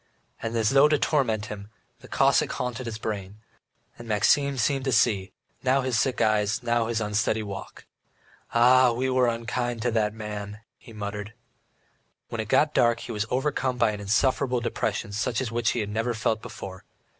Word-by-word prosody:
And 115 0 -2
as 110 -1 +2
though 140 +2 +6
to 150 0 +3
torment 120 -9 +1
him 105 -1 -8 0.3
the - - -14
Cossack - - +2
haunted 125 0 -4
his 110 -2 -4
brain, 105 -2 -5 0.6
and 120 - -9
Maxim 135 +6 +2
seemed 135 +3 +1
to 135 - +1
see 105 -4 +2 0.3
now 135 +1 +2
his 130 -3 0
sick 130 0 0
eyes, 105 +1 +1
now 120 -1 +1
his 115 -1 -1
unsteady 110 +1 0
walk. 100 -2 -8 0.7
"Ah, 125 +1 +5
we 130 +2 -1
were 130 -1 +3
unkind 120 0 -2
to 120 - +1
the 110 -2 +1
man," 105 -1 -7 0.2
he - - -14
muttered. 105 0 -6 1.0
When 115 - -3
it 110 - -6
got 150 +6 +3
dark, 120 -1 +3
he - - -7
was 105 0 -2
overcome 130 -1 -1
by 115 -3 +3
an 105 - -6
insufferable 125 +5 +1
depression 115 -2 -2
such 110 +3 -1
as 130 -3 -2 0.2
he 120 - 0
had 105 - -4
never 115 +3 -1
felt 110 0 0
before. 95 -1 -9
115 Hz, 180 wpm, -26 LUFS, 105-125 Hz, 1.0 s, though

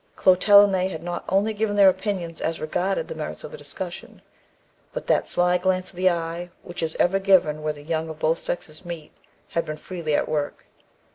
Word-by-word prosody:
Clotel 200 +2 +7
and 200 -1 +2
they 185 0 +2
had 160 -4 -6
not 175 0 -4
only 200 +4 +2
given 210 -1 -1
their 200 -1 +7
opinions 185 -3 -1
as 165 0 -1
regarded 180 +5 -1
the - - -5
merits - - -6
of - - -8
the 475 - -8
discussion, - - -7 0.7
but - - -5
that - - +2
sly 180 0 +2
glance 185 0 0
of - - -16
the 185 +1 +3
eye, 170 0 -3
which 175 -1 -7
is 160 -1 0
ever 190 +2 +3
given 185 -6 +3
where 155 0 -1
the 145 -1 -12
young 160 +1 -2
of 160 - -7
both 160 +2 +1
sexes 155 -1 -5
meet, 170 -4 -7 0.4
had 170 - 0
been 155 0 -5
freely 165 -3 -3
at - - +1
work. 145 -2 -3
175 Hz, 210 wpm, -24 LUFS, 160-190 Hz, 0.7 s, Clotel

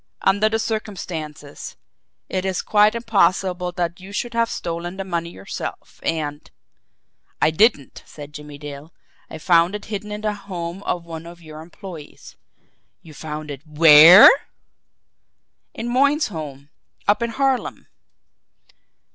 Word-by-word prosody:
Under 200 +3 +3
the 220 - 0
circumstances, 175 -10 -6 0.5
it 185 -1 -3
is 190 -2 -2
quite 210 +1 +3
impossible 190 -5 +1
that 175 +1 -3
you 190 +2 -11
should 235 +4 -4
have 230 0 +1
stolen 175 +2 -5
the 195 - -3
money 170 -3 -3
yourself, 95 - -8
and 150 -2 -3 0.4
" - - -46
"I - - +3
didn't," 155 - +1
said 150 -1 -11
Jimmie 150 -1 -10
Dale. 145 +2 -10 0.4
"I - - -8
found 170 +3 +3
it 210 - -7
hidden 210 +1 -5
in 210 0 -5
the 215 -1 -1
home 185 -3 -7
of 175 -1 -2
one 165 0 -8
of 170 0 -12
your 155 -1 -10
employees." 175 -1 -12 0.7
"You 160 - -14
found 150 0 -7
it 135 -2 -8
WHERE?" 155 +4 +9 1.5
"In 230 - -5
Moyne's 280 +4 +2
home 145 -5 -8 0.4
up 205 +3 +3
in 235 - -1
Harlem." 270 +1 -1
175 Hz, 140 wpm, -21 LUFS, 155-210 Hz, 1.5 s, WHERE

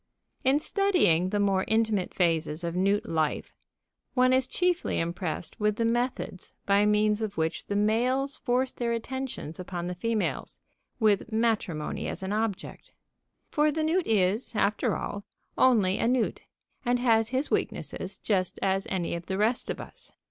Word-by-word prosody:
In 265 +2 +4
studying 305 - +2
the 205 +1 0
more 195 -2 +2
intimate 220 -4 +1
phases 165 -2 +1
of 170 0 -3
newt 195 +3 +1
life, 160 -2 -1 0.6
one 255 0 +4
is 260 0 +2
chiefly 360 -1 0
impressed 170 0 -3
with 210 -1 +1
the 230 - 0
methods 240 -5 -2
by 200 +1 +4
means 210 +1 +2
of 210 -2 -3
which 160 0 -2
the 200 - -2
males 250 +7 +1
force 255 0 0
their 235 -1 -2
attentions 240 - -5
upon 180 -1 -5
the 180 - -3
females, 220 +4 -2 0.4
with 215 -1 +2
matrimony 220 -9 -1
as - - -4
an 190 +2 -2
object. 215 -3 -3 0.6
For 300 0 +3
the 310 +1 -1
newt 335 +3 +1
is, 215 +2 +1
after 210 0 +1
all, 205 - -5 0.3
only 210 -7 +3
a - - +2
newt, 250 -1 0 0.4
and 245 0 +2
has 225 -2 +3
his 265 +4 -1
weaknesses - - -2
just 185 -4 -1
as 195 0 +1
any 180 -3 -2
of 170 0 -5
the 190 - -2
rest 220 +4 +1
of - - -3
us. - - -11
215 Hz, 160 wpm, -28 LUFS, 185-245 Hz, 0.6 s, In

